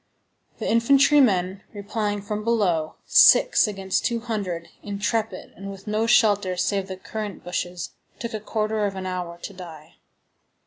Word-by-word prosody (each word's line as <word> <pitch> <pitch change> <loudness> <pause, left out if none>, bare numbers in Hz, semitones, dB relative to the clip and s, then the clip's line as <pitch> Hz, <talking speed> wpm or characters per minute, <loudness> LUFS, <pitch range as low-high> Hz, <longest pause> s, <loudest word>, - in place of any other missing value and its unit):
The - - -4
infantry 275 +5 +4
men, 190 -5 +1
replying 205 0 -3
from 210 +1 -4
below, 190 -9 0
six - - +6
against 195 -2 -2
two 235 -1 -1
hundred, 200 -8 -4
intrepid 205 0 -3
and 195 +1 -8
with 195 0 -10
no 215 +2 0
shelter 205 -5 +3
save 195 +2 0
the 190 -1 -6
currant 210 +1 -6
bushes, 180 0 -4 0.3
took 235 -1 -6
a 215 - -3
quarter 215 0 -1
of 195 - -5
an 190 0 -5
hour 180 -2 -4
to 200 - -6
die. 165 -5 -12
200 Hz, 150 wpm, -24 LUFS, 185-220 Hz, 0.3 s, six